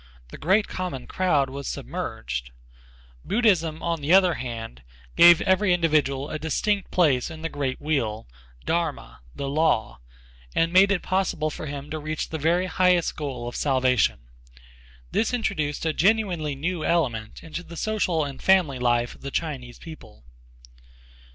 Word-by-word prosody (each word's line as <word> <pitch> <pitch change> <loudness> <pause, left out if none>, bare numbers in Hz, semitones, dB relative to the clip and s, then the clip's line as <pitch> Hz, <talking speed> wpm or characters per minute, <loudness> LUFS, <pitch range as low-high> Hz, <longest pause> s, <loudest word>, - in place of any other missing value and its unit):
The - - -10
great 195 +6 +2
common 175 -9 -5
crowd 155 -7 +1
was 140 0 -6
submerged. - - -5 0.7
Buddhism, 180 -9 +1
on 170 -2 -1
the 145 +3 -1
other 185 -2 +6
hand, 115 - -6 0.3
gave 170 -1 +8
every 190 -1 +3
individual 150 -4 +1
a 155 - -3
distinct 195 +6 -1
place 145 -8 +2
in 160 -1 -9
the 165 - -2
great 140 -4 -3
wheel 125 -8 -2 0.4
dharma, 155 - -2 0.2
the 140 - -4
law, 140 - +1 0.6
and 165 +1 +1
made 195 +2 +6
it 195 - 0
possible 185 -5 0
for 155 - -7
him 145 +1 -7
to 155 - -3
reach 155 +1 -4
the 160 - -4
very 170 +4 +2
highest 180 -2 +2
goal 130 -5 -5
of 120 - -6
salvation. 130 - +2 0.9
This 230 +2 +1
introduced 160 -11 -2
a 160 - +1
genuinely 180 -6 +1
new 165 +3 -3
element 120 -12 -1
into 165 +2 -6
the 170 -1 -11
social 185 -8 0
and 140 -2 -8
family 180 -9 +3
life 120 -1 +1
of - - -18
the 140 - -5
Chinese 135 -6 -4
people. 155 - -13
155 Hz, 150 wpm, -25 LUFS, 135-180 Hz, 0.9 s, gave